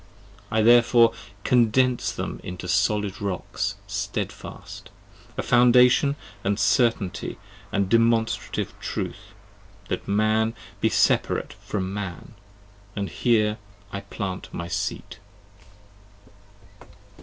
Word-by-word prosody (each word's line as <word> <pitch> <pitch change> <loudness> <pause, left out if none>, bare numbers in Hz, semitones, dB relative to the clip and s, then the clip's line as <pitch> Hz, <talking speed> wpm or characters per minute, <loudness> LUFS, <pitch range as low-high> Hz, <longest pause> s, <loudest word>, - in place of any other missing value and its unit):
10 110 - -1
I - - +5
therefore 120 0 +6 0.3
condense 125 +1 +3
them - - -5
into 90 0 -6
solid 100 +1 +1
rocks, 100 -3 -3
stedfast: - - -5 0.5
A - - -1
foundation 125 +3 +5 0.3
and 100 0 0
certainty 115 -8 +1 0.3
and 100 -1 +1
demonstrative 115 +1 +1
truth: - - -5 0.5
That - - -3
Man 110 +3 +2 0.2
be 110 - +2
separate - - +1
from 95 -2 -4
Man, 95 -3 -6 0.4
& 100 0 -28
here 105 +2 +1 0.3
I 100 - -4
plant 100 -1 -6
my 85 - -5
seat. 85 +2 -4
105 Hz, 100 wpm, -25 LUFS, 100-115 Hz, 0.5 s, therefore